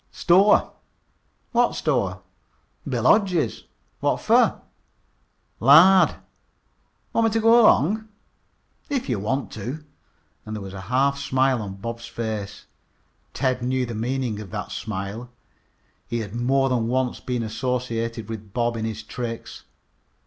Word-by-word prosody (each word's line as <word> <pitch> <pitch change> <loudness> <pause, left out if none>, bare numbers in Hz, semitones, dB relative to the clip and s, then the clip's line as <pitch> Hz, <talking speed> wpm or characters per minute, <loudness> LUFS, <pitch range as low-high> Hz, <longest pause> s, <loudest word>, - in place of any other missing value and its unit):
"Store." 190 +4 +4 0.8
"What 240 0 +2
store?" 100 - -1 0.7
"Bill 120 -4 -1
Hodge's." 185 - +2 0.3
"What - - 0
fer?" - - +3 1.0
"Lard." 165 +10 +7 1.0
"Want 230 - +2
me 225 - +2
t' 225 - +1
go 230 +2 +6
'long?" 215 - +3 0.8
"If 275 -4 -2
you 120 -6 -1
want 130 +7 -2
to," 125 +9 -6 0.6
and 110 - -6
there 105 - -6
was 95 -1 -8
a 95 - -7
half 140 +2 +2
smile 130 -2 +1
on 100 -2 -6
Bob's 115 +3 -6
face. 110 -3 -5 0.7
Ted 130 -2 0
knew 130 +1 0
the 120 - -6
meaning 120 0 -2
of 105 -3 -8
that - - -6
smile. 105 +3 -5 0.8
He 120 -1 -2
had 100 -2 -7
more 135 +3 +2
than 120 -3 0
once 125 0 -1
been 125 -2 -3
associated 115 -1 -3
with 105 -3 -8
Bob 120 -1 0
in 110 - -3
his 110 0 -5
tricks. 120 -2 -7
125 Hz, 135 wpm, -23 LUFS, 110-140 Hz, 1.0 s, Lard